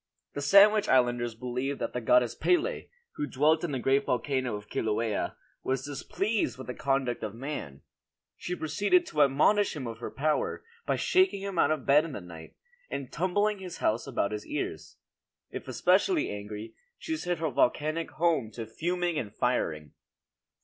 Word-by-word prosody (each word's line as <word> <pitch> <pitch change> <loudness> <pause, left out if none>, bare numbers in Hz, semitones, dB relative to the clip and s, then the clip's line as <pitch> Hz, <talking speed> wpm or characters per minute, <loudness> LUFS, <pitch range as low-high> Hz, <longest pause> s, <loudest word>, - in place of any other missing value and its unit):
The 145 - -4
Sandwich 200 +7 +6
Islanders 120 -2 +2
believed 125 +3 -3
that - - -4
the 125 - -2
goddess 120 +1 +4
Pele, 360 +8 0 0.3
who 145 - -2
dwelt 155 +5 +2
in 170 - -2
the 135 - -1
great 135 +2 +2
volcano 130 -2 0
of 105 0 -8
Kilauea, 110 0 -1 0.3
was 130 0 -1
displeased 195 - -2
with 130 - -8
the 125 - -5
conduct 135 -4 -1
of 110 -1 -5
man; 115 - -6 0.5
she 180 - -4
proceeded 205 - +2
to 150 - 0
admonish 150 +9 +3
him 140 -4 -5
of 115 -1 -6
her - - -5
power, 150 - -1 0.2
by - - +2
shaking 370 - +2
him 195 -3 -3
out - - +4
of 155 -4 -1
bed 145 +2 +5
in 165 -3 -6
the - - -4
night, 85 -3 -11 0.3
or 140 - -4
tumbling 205 +4 0
his 180 -2 -7
house 110 +2 0
about 100 - -1
his 105 0 -5
ears. - - -5 0.5
If - - -7
especially 205 - +2
angry, 105 +2 -7 0.2
she 320 - -3
set 180 - -2
her 160 -1 -1
volcanic 155 +6 +1
home 160 -8 +1
to 115 0 -5
fuming 175 +7 -1
and 105 - -5
firing. 80 - -1
140 Hz, 170 wpm, -29 LUFS, 120-175 Hz, 0.5 s, Sandwich